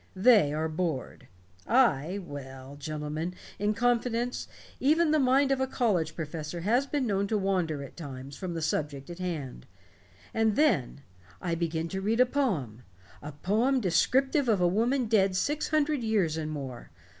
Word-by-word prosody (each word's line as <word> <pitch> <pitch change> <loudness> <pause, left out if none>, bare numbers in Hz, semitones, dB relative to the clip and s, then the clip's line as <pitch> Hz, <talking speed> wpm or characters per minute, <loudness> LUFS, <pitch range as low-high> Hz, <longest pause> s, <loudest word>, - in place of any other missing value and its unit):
They 200 - +5
are 155 +2 -1
bored. 155 -5 -3 0.4
I 200 - +3
well, 135 -6 -8
gentlemen, 155 +4 -4 0.2
in 210 +1 +1
confidence, 240 +1 0 0.3
even 310 +4 +3
the 310 - +4
mind 270 +1 +3
of 270 -1 +1
a 265 - +1
college 185 -12 0
professor 160 +1 -5
has 240 +9 +2
been 285 -2 -1
known 200 -2 0
to 215 - 0
wander 180 -7 0
at 140 - -11
times 140 -4 -8
from 180 -3 -5
the 165 - -3
subject 145 -1 -2
in 170 - -8
hand. 165 -8 -5 0.7
And 220 -2 +2
then 145 - +2 0.4
I 175 -2 -2
begin 165 -1 -1
to 190 +2 -3
read 220 +4 0
a 250 - +7
poem 180 - -1 0.4
a 150 - -7
poem 220 - +1
descriptive 265 - +2
of 210 -4 +3
a 180 - +4
woman 235 +8 +1
dead 195 -4 +2
six 290 +10 0
hundred 305 -2 +1
years 205 -8 +1
and 155 -1 -3
more. 135 -5 -6
185 Hz, 165 wpm, -29 LUFS, 155-245 Hz, 0.7 s, a